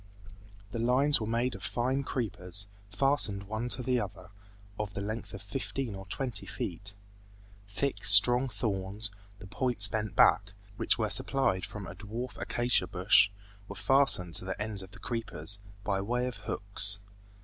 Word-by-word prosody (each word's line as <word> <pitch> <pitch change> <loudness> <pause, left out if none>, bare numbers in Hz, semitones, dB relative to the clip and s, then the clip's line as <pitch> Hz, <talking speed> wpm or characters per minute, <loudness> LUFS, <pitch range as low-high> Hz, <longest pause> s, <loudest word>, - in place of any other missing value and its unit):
The 115 - -4
lines 130 +4 +3
were 110 - -3
made 120 +3 0
of - - -9
fine 130 +3 -1
creepers, 100 -7 -2 0.2
fastened 110 -5 +1
one 110 +4 -4
to 125 - -1
the 125 0 +1
other, 95 -3 -7 0.5
of 105 -1 -4
the - - -3
length 110 +2 -5
of 100 +1 -9
fifteen 130 +2 -4
or 95 -1 -9
twenty 130 +3 -3
feet. 100 +1 -3 0.7
Thick, 100 +2 -3
strong 120 +6 +8
thorns, 100 -1 -3 0.3
the 105 - -12
points 105 +3 +4
bent 110 -1 -3
back 100 0 +4 0.2
(which - - +2
were 110 -3 -1
supplied 105 -3 +2
from 105 -3 -7
a 90 - -8
dwarf 110 +6 -7
acacia 120 -6 0
bush) 95 +2 +4 0.4
were 100 - -8
fastened 100 -6 +3
to - - -3
the 95 +1 -5
ends 105 -2 -3
of 95 - -11
the - - -15
creepers, 115 -3 -3 0.2
by 100 -2 -1
way 120 +5 -1
of 125 -2 -5
hooks. 100 -1 -1
105 Hz, 160 wpm, -30 LUFS, 100-125 Hz, 0.7 s, strong